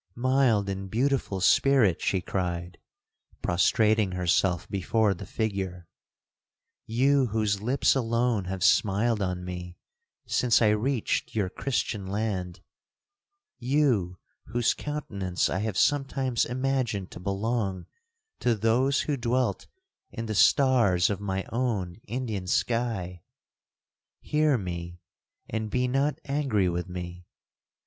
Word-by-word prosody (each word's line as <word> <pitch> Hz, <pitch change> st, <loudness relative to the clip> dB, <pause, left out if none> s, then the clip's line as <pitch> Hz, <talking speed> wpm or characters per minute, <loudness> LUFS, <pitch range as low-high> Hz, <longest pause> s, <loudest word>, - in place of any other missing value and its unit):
'Mild 125 Hz, -5 st, +2 dB
and 95 Hz, 0 st, -4 dB
beautiful 125 Hz, -3 st, 0 dB
Spirit!' 120 Hz, -2 st, +4 dB
she 95 Hz, -, 0 dB
cried, 90 Hz, -2 st, -3 dB, 0.6 s
prostrating 105 Hz, +2 st, +2 dB
herself 90 Hz, 0 st, +1 dB
before 100 Hz, +2 st, +1 dB
the 85 Hz, -, -9 dB
figure—'you 95 Hz, -5 st, -3 dB, 1.4 s
whose 105 Hz, -2 st, 0 dB
lips 125 Hz, +5 st, +2 dB
alone 115 Hz, -4 st, 0 dB
have 95 Hz, 0 st, -4 dB
smiled 105 Hz, +3 st, +3 dB
on 90 Hz, -1 st, -2 dB
me 90 Hz, -1 st, -7 dB, 0.5 s
since 120 Hz, -4 st, +3 dB
I 110 Hz, -, +4 dB
reached 115 Hz, +3 st, -1 dB
your 100 Hz, -4 st, 0 dB
Christian 105 Hz, -3 st, -2 dB
land,—you 110 Hz, -, -3 dB, 0.3 s
whose 120 Hz, -1 st, +1 dB
countenance 100 Hz, -12 st, -2 dB
I 95 Hz, -, -1 dB
have 105 Hz, -1 st, -2 dB
sometimes 135 Hz, -3 st, +1 dB
imagined 125 Hz, -6 st, -2 dB
to -, -, -9 dB
belong 100 Hz, 0 st, -2 dB, 0.5 s
to 120 Hz, -2 st, +2 dB
those 120 Hz, +6 st, +2 dB
who 150 Hz, -, -1 dB
dwelt 125 Hz, 0 st, -1 dB, 0.4 s
in 115 Hz, -1 st, -5 dB
the 110 Hz, -, -3 dB
stars 110 Hz, -7 st, +4 dB
of 100 Hz, -, -3 dB
my 95 Hz, -1 st, -2 dB
own 110 Hz, -6 st, -2 dB
Indian 110 Hz, -5 st, -3 dB
sky,—hear 115 Hz, -, -3 dB
me, 85 Hz, -3 st, -6 dB, 0.5 s
and 110 Hz, 0 st, -3 dB
be 125 Hz, +3 st, 0 dB
not 135 Hz, +4 st, 0 dB
angry 135 Hz, -9 st, +1 dB
with 90 Hz, +1 st, -3 dB
me! 90 Hz, -1 st, -7 dB
110 Hz, 110 wpm, -27 LUFS, 95-125 Hz, 1.4 s, Spirit